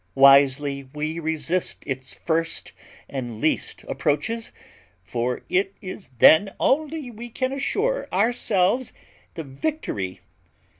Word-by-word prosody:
Wisely 140 Hz, 0 st, +5 dB
we 155 Hz, +2 st, -2 dB
resist 160 Hz, +2 st, -1 dB
its 130 Hz, -1 st, -4 dB
first 165 Hz, 0 st, -1 dB, 0.4 s
and 120 Hz, -5 st, -5 dB
least 155 Hz, -, -1 dB
approaches; 220 Hz, +11 st, -1 dB, 0.5 s
for 120 Hz, +7 st, -2 dB
it 195 Hz, +1 st, 0 dB
is 185 Hz, 0 st, -8 dB
then 190 Hz, -, +6 dB
only 305 Hz, -2 st, 0 dB
we 235 Hz, +2 st, -8 dB
can 255 Hz, +3 st, -2 dB
assure 415 Hz, -, -1 dB
ourselves 215 Hz, +2 st, +1 dB, 0.4 s
the 165 Hz, -, -4 dB
victory. 135 Hz, -, -4 dB
165 Hz, 105 wpm, -24 LUFS, 140-230 Hz, 0.5 s, then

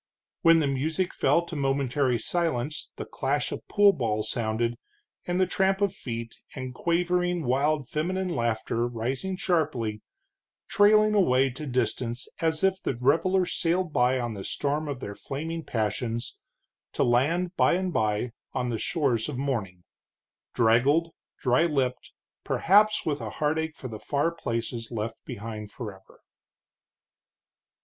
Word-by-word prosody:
When 165 Hz, -1 st, +7 dB
the 160 Hz, -, +2 dB
music 155 Hz, +7 st, -1 dB
fell 170 Hz, -, +2 dB
to 170 Hz, -, -7 dB
momentary 135 Hz, -2 st, +1 dB
silence 150 Hz, +1 st, -2 dB
the -, -, -6 dB
clash -, -, -1 dB
of -, -, -6 dB
pool 205 Hz, -1 st, +5 dB
balls 110 Hz, -, -1 dB
sounded, 115 Hz, +1 st, -1 dB, 0.5 s
and 180 Hz, +1 st, 0 dB
the 185 Hz, -, +5 dB
tramp 190 Hz, +1 st, +1 dB
of 200 Hz, -2 st, +1 dB
feet, 115 Hz, -8 st, -6 dB, 0.2 s
and 130 Hz, -2 st, -5 dB
quavering 175 Hz, +2 st, 0 dB
wild 140 Hz, +2 st, +1 dB
feminine 185 Hz, +4 st, -1 dB
laughter 115 Hz, -3 st, 0 dB
rising 130 Hz, +11 st, -3 dB
sharply, 135 Hz, -, 0 dB, 0.7 s
trailing 215 Hz, +1 st, +5 dB
away 135 Hz, -10 st, +3 dB
to 145 Hz, +4 st, -7 dB
distance 120 Hz, 0 st, -1 dB
as 160 Hz, 0 st, 0 dB
if 190 Hz, 0 st, +2 dB
the 125 Hz, -, -2 dB
revelers 165 Hz, +8 st, +2 dB
sailed 175 Hz, -1 st, 0 dB
by 125 Hz, +1 st, +3 dB
on 120 Hz, -2 st, -2 dB
the 100 Hz, -2 st, -6 dB
storm 145 Hz, +7 st, -2 dB
of 140 Hz, -3 st, -4 dB
their 100 Hz, -, -5 dB
flaming 160 Hz, +8 st, -5 dB
passions, 115 Hz, +1 st, -2 dB, 0.6 s
to -, -, +1 dB
land 165 Hz, +10 st, +2 dB
by -, -, +4 dB
and 185 Hz, 0 st, -1 dB
by 110 Hz, +1 st, 0 dB, 0.2 s
on 125 Hz, -1 st, -1 dB
the 115 Hz, -, -2 dB
shores 135 Hz, -8 st, 0 dB
of 140 Hz, -, -4 dB
morning, 110 Hz, -10 st, -3 dB, 0.7 s
draggled, 130 Hz, +9 st, +3 dB, 0.3 s
dry 125 Hz, +4 st, +3 dB
lipped, 135 Hz, -5 st, -1 dB, 0.3 s
perhaps 210 Hz, +4 st, +3 dB
with 150 Hz, -2 st, -1 dB
a -, -, -4 dB
heartache 160 Hz, +1 st, -1 dB
for 130 Hz, -, -7 dB
the 110 Hz, -3 st, -7 dB
far 145 Hz, +7 st, 0 dB
places 115 Hz, -6 st, -4 dB
left 115 Hz, 0 st, -4 dB
behind 105 Hz, 0 st, -7 dB
forever. 100 Hz, -5 st, -10 dB
140 Hz, 140 wpm, -27 LUFS, 120-170 Hz, 0.7 s, When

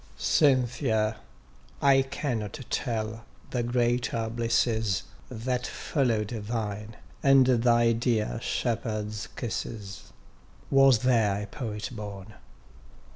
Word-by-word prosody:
Cynthia! 120 Hz, -6 st, +2 dB, 0.6 s
I 135 Hz, -1 st, +5 dB
cannot 120 Hz, -6 st, -3 dB
tell 110 Hz, -1 st, -2 dB, 0.3 s
the 125 Hz, -, 0 dB
greater 120 Hz, -1 st, 0 dB
blisses, 115 Hz, -3 st, +1 dB, 0.3 s
That 125 Hz, +1 st, -2 dB
follow'd 115 Hz, -8 st, -1 dB
thine, 105 Hz, -1 st, -4 dB, 0.3 s
and 135 Hz, -1 st, +6 dB
thy 120 Hz, -2 st, +4 dB
dear 115 Hz, -, 0 dB
shepherd's 110 Hz, -3 st, -2 dB
kisses: 110 Hz, -4 st, -5 dB, 0.6 s
Was 135 Hz, -4 st, +5 dB
there 110 Hz, -5 st, +2 dB
a -, -, -4 dB
Poet 105 Hz, -1 st, -5 dB
born? 105 Hz, -3 st, -8 dB
115 Hz, 90 wpm, -27 LUFS, 105-125 Hz, 0.6 s, and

